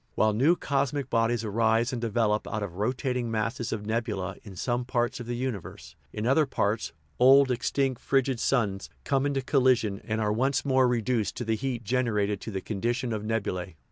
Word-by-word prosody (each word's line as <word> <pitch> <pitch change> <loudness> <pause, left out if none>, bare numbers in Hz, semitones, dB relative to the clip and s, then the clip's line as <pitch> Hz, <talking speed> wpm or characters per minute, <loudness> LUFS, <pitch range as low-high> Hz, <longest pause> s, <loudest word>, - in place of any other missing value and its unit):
While 110 0 +3
new 140 +11 +4
cosmic 140 -2 -1
bodies 115 0 +1
arise 115 +3 +1
and 120 - -3
develop 110 -2 0
out 110 -2 -3
of 90 -3 -6
ro 105 +5 +1
tating 125 -2 -2
masses 115 +1 -2
of 105 -2 -3
nebula 105 -4 -2
in 100 -3 -11
some 120 +6 -1
parts 120 -1 -1
of 120 - -7
the 120 - -2
universe, 100 -10 -5 0.2
in 105 +6 -4
other 140 +4 +3
parts 110 -4 -1 0.3
old, 135 +1 +6
extinct, 130 +1 0
frigid 135 -2 +1
suns 105 -8 0
come 135 0 +1
into 135 -2 -1
colli 130 -1 +4
sion, 105 -4 -4
and 110 0 -2
are 105 -1 +1
once 130 +6 0
more 130 -2 +4
reduced 120 -2 0
by 120 - -3
the 110 0 +1
heat 120 0 -3
generated 105 -4 0
to - - -6
the 95 -3 -4
condition 120 +4 -2
of 105 -1 -3
nebulae. 95 -5 -2
115 Hz, 195 wpm, -27 LUFS, 105-130 Hz, 0.3 s, old